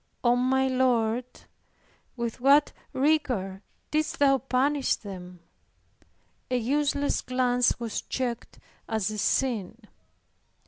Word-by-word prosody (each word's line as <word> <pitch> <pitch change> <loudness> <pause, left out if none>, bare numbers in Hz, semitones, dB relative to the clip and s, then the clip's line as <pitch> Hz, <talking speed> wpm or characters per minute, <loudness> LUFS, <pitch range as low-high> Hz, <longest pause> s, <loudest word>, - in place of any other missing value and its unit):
O 240 0 +4
my 265 +2 +2
Lord, 250 -2 +1 0.9
with 235 -1 -4
what 280 +3 +5 0.2
rigor 260 -10 0 0.3
didst 310 0 0
Thou 275 -1 +4
punish 270 +3 +1
them! 180 -3 -10 1.1
A 250 - +1
useless 285 +4 0
glance 250 -1 +1
was 230 -2 -3
checked 245 -3 -4 0.3
as 220 -2 -1
a 215 - -5
sin. 225 -5 0
250 Hz, 100 wpm, -27 LUFS, 225-270 Hz, 1.1 s, what